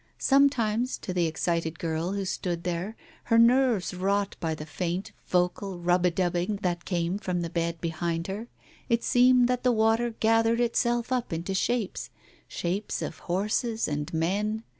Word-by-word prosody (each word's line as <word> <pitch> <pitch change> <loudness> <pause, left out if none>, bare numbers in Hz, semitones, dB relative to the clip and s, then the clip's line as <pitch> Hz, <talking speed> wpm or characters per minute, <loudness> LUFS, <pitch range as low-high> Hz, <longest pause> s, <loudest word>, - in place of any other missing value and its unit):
Sometimes, 255 -4 +2
to 185 - -5
the 175 -2 +2
excited 165 0 -1
girl, 165 +3 -2
who 200 -1 -2
stood 175 -2 -3
there, 180 +5 -3 0.3
her 230 - +3
nerves 235 -4 +4
wrought 195 +2 0
by 160 -1 -1
the 150 - -7
faint 175 +3 -3 0.2
vfoal 180 +1 0
rub 180 +1 +2
a - - +4
dubbing 175 +3 0
that 175 -1 -1
came 175 +1 -1
from 180 -3 -2
the 165 - -4
bed 170 -1 -1
behind 165 0 -2
her, 205 +5 -5 0.4
it 235 -1 +2
seemed 250 0 +5
that 250 0 0
the 250 - +3
water 225 +1 +2
gathered 225 +1 +3
itself 240 0 +1
up 250 -2 -1
into 170 +4 -3
shapes 225 +2 -1 0.2
— - - -30
shapes 185 +5 -3
of 160 - -6
horses 215 +5 -1
and 150 -1 -3
men. 205 +7 -1
190 Hz, 165 wpm, -27 LUFS, 170-230 Hz, 0.4 s, seemed